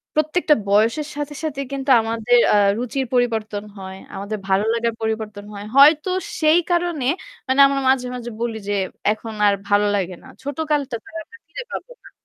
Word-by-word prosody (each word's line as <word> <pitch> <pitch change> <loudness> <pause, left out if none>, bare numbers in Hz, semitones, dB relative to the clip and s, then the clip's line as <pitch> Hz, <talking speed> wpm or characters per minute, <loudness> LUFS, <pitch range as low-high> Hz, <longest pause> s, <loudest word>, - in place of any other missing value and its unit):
প্রত্যেকটা 310 0 +2
বয়সের 230 +9 +2
সাথে, 295 0 -4
সাথে 285 -3 -3
কিন্তু 275 0 -4
আমাদের 230 +2 +1 0.2
আ - - +5 0.2
রুচির 255 +2 -2
পরিবর্তন 220 -4 0
হয়। 190 0 -8 0.2
আমাদের 205 +2 -4
ভালো 195 +2 +2
লাগার 230 0 0
পরিবর্তন 220 -2 -3
হয়। 205 0 -7
হয়তো 300 +5 +6 0.3
সেই 310 +3 +5
কারণে 345 -6 0 0.4
মানে 260 +2 +1
আমরা 275 0 -1
মাঝে, 255 -1 +2
মাঝে 240 -1 -6
বলি 230 -2 -2
যে, - - +1 0.4
"এখন 220 +1 -5
আর 200 - +4 0.2
ভালো 205 0 +4
লাগে 185 -2 -2
না। - - -14 0.2
ছোট 285 +1 -5
কালটা 280 -5 0
তো - - -23
আর - - -7 0.2
ফিরে 485 +10 -7
পাবোনা।" - - -9
245 Hz, 170 wpm, -21 LUFS, 215-290 Hz, 0.4 s, হয়তো